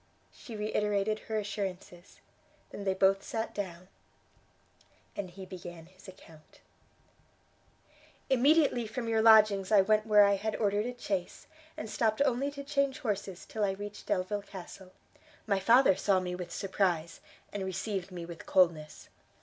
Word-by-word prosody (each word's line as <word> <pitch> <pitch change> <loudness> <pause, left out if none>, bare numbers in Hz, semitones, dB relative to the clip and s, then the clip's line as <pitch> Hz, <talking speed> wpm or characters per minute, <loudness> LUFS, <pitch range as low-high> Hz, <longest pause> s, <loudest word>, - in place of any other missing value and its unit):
She 230 - -10
reiterated 210 0 0
her 220 - -1
assurances; 190 -3 -6 0.5
they 200 - -7
then 190 -1 -1
both 195 +1 +4
sat 225 +2 -4
down, 185 -3 -6 1.3
and 195 -3 -4
he 190 +2 -10
began 175 -3 -9
his 185 +3 -18
account. 165 -4 -16 1.7
"Immediately 270 -2 +3
from 230 +2 -5
your 225 -1 +2
lodgings 215 -3 +6
I 205 -2 +7
went 215 +2 +2
where 210 -1 +7
I 200 0 +3
had 215 +2 -3
ordered 210 +1 0
a 245 0 -7
chaise, 190 -6 -3 0.3
and 215 - -5
stopped 220 0 0
only 270 +2 0
to 280 0 -8
change 280 -1 0
horses 200 -6 -3
till 220 - -3
I 195 -1 +1
reached 205 +1 -8
Delvile 195 +3 -1
Castle. 190 -1 -11 0.5
My 200 -3 +1
father 235 +1 +5
saw 195 0 +2
me 180 -1 -4
with 180 -1 -6
surprise, 180 -4 -1 0.3
and 205 -1 -3
received 190 0 -4
me 175 -2 -6
with 170 -1 -10
coldness. 165 -5 +1
200 Hz, 150 wpm, -30 LUFS, 185-220 Hz, 1.7 s, I